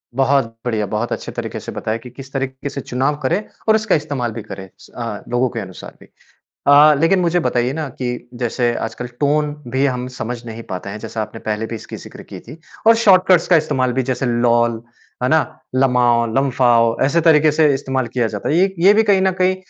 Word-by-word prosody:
बहुत 135 0 +3 0.2
बढ़िया, 110 -4 -1
बहुत 110 +4 -3
अच्छे - - -4
तरीके - - -5
से - - -8
बताया 110 +1 -3
कि 125 +2 -12
किस 130 +2 -12
तरीके 135 0 -3
से 140 - -6
चुनाव 130 +5 -1
करें 175 +10 0 0.3
और 220 - +6
इसका 220 -1 +1
इस्तेमाल 130 -6 -2
भी 115 0 -6
करें 95 -3 -9
स, - - -16
अ, 115 -4 -5
लोगों 120 +1 +1
के - - -5
अनुसार 95 -3 -9
भी। - - -16 0.6
अ, 145 +2 +7
लेकिन 180 +4 +3
मुझे 175 0 +1
बताइए 125 -4 0
ना 155 -1 -4
कि 125 -1 -4
जैसे 120 0 -1
आजकल 120 +2 -5
टोन 150 0 +1 0.2
भी 130 +1 +1
हम 125 -1 -2
समझ 120 +1 -5
नहीं 115 0 -7
पाते 95 +2 -5
हैं, 105 - -6
जैसे 110 - -6
आपने 110 +1 -6
पहले 110 +1 -3
भी 115 - -6
इसकी 110 - -8
ज़िक्र - - -11
की - - -7
थी 160 - -12 0.3
और 230 - +8
शॉर्टकट्स 185 -3 +5
का 175 - +6
इस्तेमाल 130 -5 0
भी 130 - 0
जैसे 130 +1 -2
लोल, 120 -1 +1 0.4
है 125 - +2
ना? 160 +2 +4 0.3
लमाओ, 125 -3 +3
लम्फाओ 120 -4 +3
ऐसे 145 +5 +2
तरीके 155 -2 +5
से 150 -1 +3
इस्तेमाल 130 -2 -2
किया 120 -2 +1
जाता 105 -2 -4
है। 155 - +1
ये 190 +2 +2
ये 190 +4 +6
भी 220 - +4
कहीं 200 -3 +3
ना 190 - +3
कहीं 185 +1 +3
130 Hz, 215 wpm, -19 LUFS, 120-150 Hz, 0.6 s, और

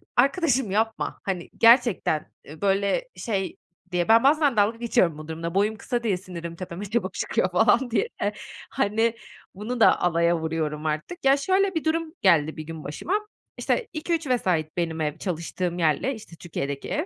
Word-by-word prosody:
arkadaşım, 270 - +2
yapma, 220 +2 -1
hani, 185 -3 -3
gerçekten, 230 - +4
eee, 155 +1 -12
böyle 200 - +1
şey 195 -5 -3 0.3
diye, 175 -1 0
ben 225 +1 +6
bazen 290 -3 +3
dalga 210 +3 +3
geçiyorum 185 -9 +1
bu 155 0 -9
durumla; 165 +2 -5
boyum 210 +2 +2
kısa 240 -1 -3
diye 200 -5 +1
sinirim 170 -3 -8
tepeme 185 +2 -6
çabuk 210 -1 -2
çıkıyor 185 - 0
falan 235 +6 +3
diye. 445 - +1 0.6
Hani, 225 -1 +1 0.4
bunu 230 +5 -4
da - - +5
alaya 170 0 +2
vuruyorum 160 -1 -3
artık. 155 - -3
Ya, 270 +1 +6
şöyle 380 +5 +1
bir 320 - -1
durum 320 0 -1
geldi 160 -5 +3
bir 155 - -5
gün 160 0 -8
başıma: 150 - -4 0.4
İşte, 475 - 0
2-3 325 -1 -2
vesait 180 -11 0
benim 165 -2 -1
ev, 150 0 -2
çalıştığım 175 0 -3
yerle, 165 - +1
işte, 215 -6 -12
Türkiye'deki 140 -5 -5
ev. 305 +4 -1
200 Hz, 165 wpm, -25 LUFS, 170-250 Hz, 0.6 s, ben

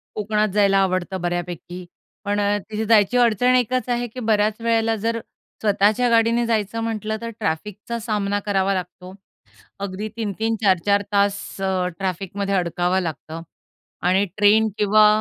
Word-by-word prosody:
कोकणात 215 0 0
जायला 200 -1 +4
आवडतं 185 -1 0
बऱ्यापैकी. 175 0 -4 0.4
पण 205 0 0
अ, 205 0 +1
तिथे 220 0 -3
जायची 220 +2 +4
अडचण 245 +1 +3
एकच 250 +1 0
आहे 245 0 0
की 240 +3 -9
बऱ्याच 215 -1 +1
वेळेला 225 -1 +1
जर 230 +2 -2 0.4
स्वतःच्या 210 +3 +2
गाडीने 230 +1 +3
जायचं 225 -1 -1
म्हटलं 220 -1 -3
तर 230 - -4
ट्रॅफिकचा 210 +6 -3
सामना 205 -2 -1
करावा 195 -1 +1
लागतो. 180 0 -6 0.7
अगदी 200 +2 -4
3-3, 225 +1 -2
4-4 200 +1 +3
तास 200 0 +2 0.2
अ, 190 -1 0
ट्रॅफिकमध्ये 195 +1 -3
अडकावं 180 0 0
लागतं 165 -1 -6 0.6
आणि 190 +2 +3
ट्रेन 215 +1 +4
किंवा 210 +1 +5
205 Hz, 140 wpm, -22 LUFS, 190-225 Hz, 0.7 s, किंवा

